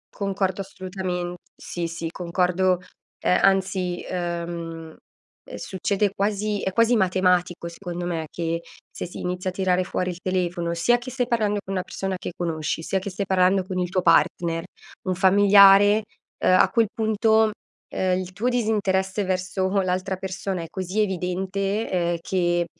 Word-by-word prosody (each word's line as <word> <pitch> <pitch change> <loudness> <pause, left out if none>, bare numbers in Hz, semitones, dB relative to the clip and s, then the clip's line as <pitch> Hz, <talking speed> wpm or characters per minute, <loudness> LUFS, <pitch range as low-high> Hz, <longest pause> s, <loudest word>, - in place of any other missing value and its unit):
Concordo 195 -1 -1
assolutamen 185 -2 -4 0.2
sì, 170 -1 -4
sì 165 0 -5
concordo, 180 +1 +1 0.4
ehm, 180 - +2
anzi, 190 -2 +1
uhm, 185 - -2 0.7
ehm 160 - -16 0.6
succede 200 +1 -1
quasi 205 0 -1
è 190 - -1
quasi 230 +5 +3
matematico 180 -3 +1
secondo 175 0 -6
me, 165 -3 -3
che 165 +1 -2 0.3
se - - -5
si 175 - -9
inizia 180 +1 -2
a - - -7
tirare 185 -1 +1
fuori 180 0 -2
il 175 - -9
telefono, 175 -2 -1
sia 240 +9 +3
che 240 +2 -8
stai 250 -1 -1
parlando 215 -4 +1
con 195 - -4
una 185 - 0
persona 190 0 -4
che 180 - -6
conosci, 160 -2 -2
sia 190 - 0
che 190 - -5
stai 195 +1 -3
parlando 190 0 +3
con 185 0 -4
il 180 -1 -1
tuo 185 0 0
partner, 165 0 +3 0.4
un 185 - +1
familiare, 200 +2 +6 0.4
uhm, 185 - +5
a - - +5
quel 230 -2 +2
punto, 220 0 +3 0.4
uhm, 185 -1 +1
il 185 -1 -6
tuo 230 +6 0
disinteresse 205 -5 0
verso 185 0 -1
l'altra 185 +1 -1
persona 190 -1 -4
è - - -7
cosi 190 +2 -2
evidente, 195 +2 -1
ehm, 175 -2 0
che 175 -1 +1
185 Hz, 160 wpm, -24 LUFS, 180-200 Hz, 0.7 s, familiare